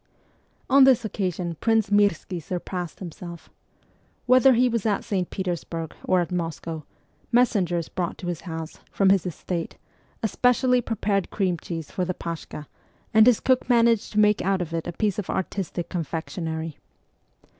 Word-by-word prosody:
On 275 0 +6
this 255 -3 +5
occasion 180 -5 -3
Prince 225 -3 +2
Mirski 200 -3 +2
surpassed 180 +1 -5
himself. 170 -1 -9 0.7
Whether 255 +1 +6
he 250 +2 +4
was 230 -4 -1
at 205 -2 0
St. 185 -4 -2
Petersburg 170 -3 -4
or 185 -1 +3
at 170 - -4
Moscow, 165 -3 -4 0.5
messengers 190 -9 +2
brought 175 -2 -3
to - - -8
his 175 -2 -3
house, 165 -2 -7
from 195 -1 +3
his 190 -2 +2
estate, 170 0 -4 0.5
a - - +3
specially 250 +3 +3
prepared 205 -4 -1
cream 190 -4 0
cheese 165 -4 -6
for 185 - -1
the 180 0 -2
paskha, 165 -2 -6 0.5
and 220 +1 +7
his 245 -3 +5
cook 255 -1 +1
managed 230 -2 +3
to 210 - +2
make 210 0 +4
out 195 +1 +1
of 170 -2 -4
it 165 -1 -2
a - - -2
piece 210 +2 0
of 200 - -5
artistic 190 -2 -3
confectionery. 160 -1 -4
185 Hz, 155 wpm, -25 LUFS, 170-215 Hz, 0.7 s, and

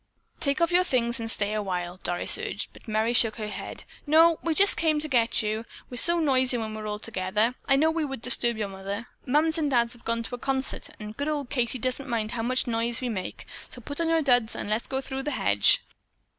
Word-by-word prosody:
"Take 280 +2 -1
off 335 0 +2
your 360 +1 +4
things 240 -6 0
and 225 0 -4
stay 210 -1 -1
a 215 - -1
while," 180 -2 -4
Doris 175 0 +2
urged, - - -5
but - - -17
Merry 220 +2 0
shook 225 -3 +3
her 215 -1 -5
head. 200 - -7 0.2
"No, 325 +2 +5
we 330 -1 -1
just 400 +3 +6
came 315 -2 +1
to 310 - 0
get 240 -5 +2
you. 215 +1 -2 0.3
We're 245 - -6
so 340 +6 +4
noisy 260 -5 +3
when 220 -2 -4
we're 215 0 -6
all 210 0 -3
together, 210 +2 -1
I 270 - +4
know 315 +4 +3
we 325 -1 -1
would 270 -5 -5
disturb 240 -2 +5
your 210 -2 -2
mother. 195 +3 -6 0.2
Mums 315 +5 +2
and 300 -2 0
Dad 235 -3 +2
have 240 - -14
gone 230 0 -1
to 235 - -8
a 245 - -4
concert 265 +1 -3
and 210 0 -8
good 285 +4 -3
old 290 -4 -3
Katie 245 -2 -1
doesn't 255 +2 -3
mind 225 -2 -1
how 230 - -3
much 255 +3 0
noise 230 -1 0
we 250 - -3
make, 190 -5 -5 0.2
so - - -9
put 285 +6 -4
on 330 - 0
your 325 -1 +2
duds 245 -4 +2
and 205 - -5
let's 220 +2 -1
go 265 0 -2
through 265 0 -5
the 290 - -3
hedge. 100 0 +3
240 Hz, 240 wpm, -26 LUFS, 215-280 Hz, 0.3 s, just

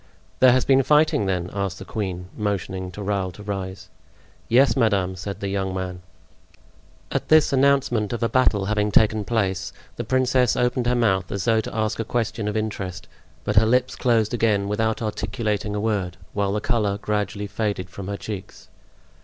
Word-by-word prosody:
"There 130 -1 +7
has 130 +1 +2
been 135 0 +5
fighting, 150 -4 +3
then?" 90 -1 -1
asked 100 -2 -2
the - - -9
queen, 90 -4 -4
motioning 95 -3 -3
to 105 - -6
Raoul 100 -2 -1
to 105 - -11
rise. 95 -2 -5 0.6
"Yes, 120 0 +5
madame," 100 -6 +1
said 100 +2 -6
the 100 - -2
young 95 -1 -2
man. 90 -1 -4 1.1
At - - -2
this 155 -2 +5
announcement 130 -6 +2
of 120 0 -3
a - - +3
battle 110 -6 +2
having 105 0 0
taken 110 0 +3
place, 100 -5 -1 0.3
the - - -2
princess 130 -2 +2
opened 125 0 +1
her 125 - +2
mouth 95 -6 +1
as 100 -2 -3
though 115 -2 +3
to - - -7
ask 110 0 -1
a - - +1
question 115 -1 -2
of 105 +1 -1
interest; 95 -5 -4 0.4
but 105 - -2
her 110 - +7
lips 125 +3 +2
closed 115 -2 +1
again 105 -4 +1
without 110 +2 0
articulating 105 -1 -2
a - - -1
word, 100 -5 -1 0.2
while 100 -1 0
the 105 - -1
color 105 -4 0
gradually 105 0 -2
faded 100 -3 -2
from 95 0 -7
her 100 0 -3
cheeks. 100 -3 -8
105 Hz, 180 wpm, -23 LUFS, 95-115 Hz, 1.1 s, There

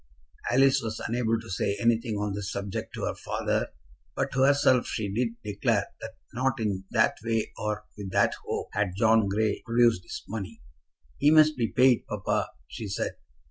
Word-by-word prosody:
Alice 135 +2 +4
was 110 -1 -4
unable 115 -1 0
to 115 - -11
say 100 +2 -1
anything 115 -1 +1
on 105 -1 -2
this 100 0 -4
subject 100 -1 -4
to - - -5
her - - -1
father, - - -2 0.5
but - - -1
to 130 - 0
herself 135 -2 +4
she 100 -3 -3
did 115 +1 -1
declare 105 -1 0
that - - -7 0.2
not 130 +1 0
in 100 -3 -2
that - - +2
way 115 -1 -1
or 105 0 -3
with 100 -2 -6
that - - +3
hope - - -3
had 100 -3 0
John 110 -2 +4
Grey 105 +2 0
produced 115 -4 +3
his - - -8
money. 110 +1 -6 0.6
"He 145 - +5
must 155 0 +6
be 115 -2 0
paid, 125 0 +3
papa," - - -1 0.2
she 110 -4 -6
said. 100 - -2
110 Hz, 180 wpm, -27 LUFS, 105-120 Hz, 0.6 s, must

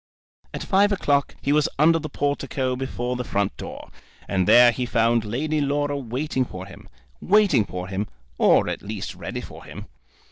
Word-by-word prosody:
At - - -5
five 205 +1 +3
o'clock 145 -8 +1
he 140 - +2
was 150 -1 +3
under 165 +3 +4
the 155 - -6
portico 140 -2 -1
before 125 -1 -3
the 125 - -3
front 100 -3 -1
door, - - -9 0.4
and 95 -2 0
there 120 0 +8
he 125 +1 -3
found 115 0 +2
Lady 150 +8 -1
Laura 145 0 0
waiting 130 +1 -2
for 95 -6 -8
him, 95 - -14 0.3
waiting 190 - +4
for 90 -1 -6
him, 100 +2 -3 0.3
or - - +4
at - - -3
least 105 -1 -5
ready - - -6
for - - -11
him. - - -9
130 Hz, 175 wpm, -23 LUFS, 110-145 Hz, 0.4 s, there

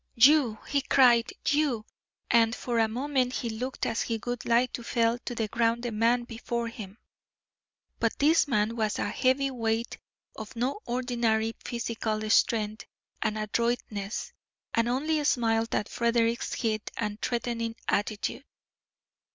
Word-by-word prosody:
"You!" 250 -2 +5
he 280 0 +1
cried, 245 -4 +4 0.2
"you!" 285 -7 +1 0.5
And 230 0 +4
for 240 -2 -1
a 225 - +4
moment 255 +2 0
he 235 -2 -2
looked 250 +4 -3
as 230 - -1
if - - -2
he 230 -1 -1
would 245 -1 -3
like 235 +1 +3
to - - -4
fell 230 0 +1
to 245 - -4
the 225 -2 -1
ground 230 +2 +1
the 240 - -2
man 230 +3 +2
before 235 0 -4
him. 210 -3 -9 1.0
But - - 0
this 310 +2 +4
man 225 -3 +1
was 215 -2 0
a - - -1
heavyweight 250 -3 0 0.4
of 220 +1 -8
no 255 - -1
ordinary 235 -3 0
physical 220 -2 -3
strength 215 -1 +2 0.3
and 215 0 0
adroitness, 215 -1 -2 0.4
and 230 0 +2
only 300 +4 0
smiled 230 -5 +1
at 205 - 0
Frederick's 235 0 0
heat 215 -3 -1
and 210 -1 -3
threatening 235 -1 -2
attitude. 205 +5 -1
235 Hz, 145 wpm, -28 LUFS, 225-245 Hz, 1.0 s, You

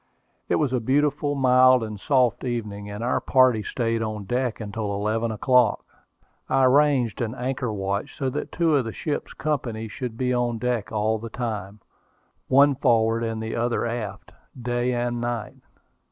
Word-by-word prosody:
It - - +3
was 145 -4 0
a 125 - +2
beautiful, 145 +4 +1
mild, 130 -2 +5
and 105 -2 -6
soft 125 -1 +2
evening, 105 -5 -4
and 105 +2 -6
our 125 - 0
party 130 -4 +4
stayed 115 +1 -1
on 110 -2 -3
deck 125 +3 -2
until 105 -1 -4
eleven 110 +3 -1
o'clock. 125 0 +2 0.6
I 135 0 +3
arranged 130 -3 +3
an 115 +1 -2
anchor 125 -1 -2
watch, 100 0 -3
so 135 - -1
that - - -4
two 165 -3 +2
of 135 -4 +2
the 115 - -5
ship's 150 -2 -4
company 120 -7 -3
should 115 +2 -6
be 125 0 0
on 120 -1 0
deck 120 -2 -2
all 110 0 0
the 115 +1 -7
time, 105 -4 -5 0.7
one 140 +2 +5
forward 115 -3 +2
and 115 -1 -3
the 110 - -4
other 120 0 0
aft, 110 -4 -5 0.3
day 120 +1 -1
and 120 -1 -1
night. 120 -2 -4
120 Hz, 170 wpm, -24 LUFS, 110-130 Hz, 0.7 s, mild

